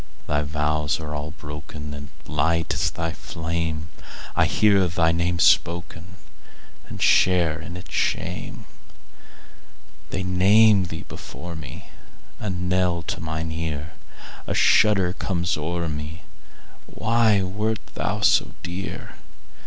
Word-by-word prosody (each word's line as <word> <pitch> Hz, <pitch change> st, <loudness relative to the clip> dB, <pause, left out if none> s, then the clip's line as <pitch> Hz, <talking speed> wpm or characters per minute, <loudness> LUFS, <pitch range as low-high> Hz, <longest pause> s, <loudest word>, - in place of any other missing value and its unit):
Thy 75 Hz, 0 st, +1 dB
vows 75 Hz, 0 st, 0 dB
are 75 Hz, -1 st, -5 dB
all 75 Hz, 0 st, -4 dB
broken, 75 Hz, 0 st, -8 dB
And 70 Hz, 0 st, -8 dB, 0.2 s
light 80 Hz, +2 st, +1 dB
is -, -, +1 dB
thy 80 Hz, 0 st, -3 dB
fame:I 80 Hz, -1 st, -3 dB
hear 100 Hz, -3 st, +4 dB
thy 80 Hz, -1 st, +2 dB
name 85 Hz, +1 st, 0 dB
spokenAnd 85 Hz, +1 st, -1 dB
share 85 Hz, -4 st, +4 dB
in 85 Hz, +2 st, -7 dB
its 90 Hz, -, -11 dB
shame. -, -, -2 dB, 1.4 s
They 95 Hz, -, -2 dB
name 100 Hz, +2 st, +5 dB
thee 80 Hz, -1 st, -7 dB
before 85 Hz, 0 st, -8 dB
me,A 80 Hz, +7 st, -10 dB
knell 90 Hz, -1 st, 0 dB
to -, -, -4 dB
mine 80 Hz, 0 st, -3 dB
ear;A 80 Hz, -1 st, -6 dB
shudder 95 Hz, -4 st, +4 dB
comes 90 Hz, -3 st, -1 dB
o'er 85 Hz, +2 st, -2 dB
me—Why 95 Hz, +7 st, -2 dB
wert 105 Hz, +4 st, -2 dB
thou -, -, -2 dB
so -, -, +4 dB
dear? 90 Hz, +2 st, -6 dB
85 Hz, 105 wpm, -24 LUFS, 80-90 Hz, 1.4 s, name